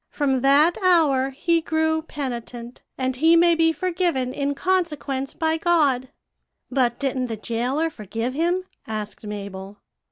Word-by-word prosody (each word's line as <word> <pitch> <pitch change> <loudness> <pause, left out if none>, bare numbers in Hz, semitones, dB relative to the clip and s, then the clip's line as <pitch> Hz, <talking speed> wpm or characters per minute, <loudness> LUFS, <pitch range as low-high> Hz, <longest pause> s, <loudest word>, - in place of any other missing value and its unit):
From 270 -3 0
that 285 +6 +4
hour 310 -8 +3
he 330 +5 0
grew 315 0 0
penitent, 245 -5 -6 0.2
and 260 -1 -1
he 325 +4 +5
may 340 0 +5
be 325 0 +3
forgiven 335 -6 -1
in 280 0 -1
consequence 300 -7 -1
by 320 0 0
God.' 290 -7 +2 0.6
"'But 245 -2 +1
didn't 260 -2 -1
the 225 -2 -4
jailer 250 +9 -1
forgive 225 +1 -4
him?' 345 +5 0 0.2
asked 215 -1 -6
Mabel. 200 -1 -7
275 Hz, 135 wpm, -23 LUFS, 245-325 Hz, 0.6 s, he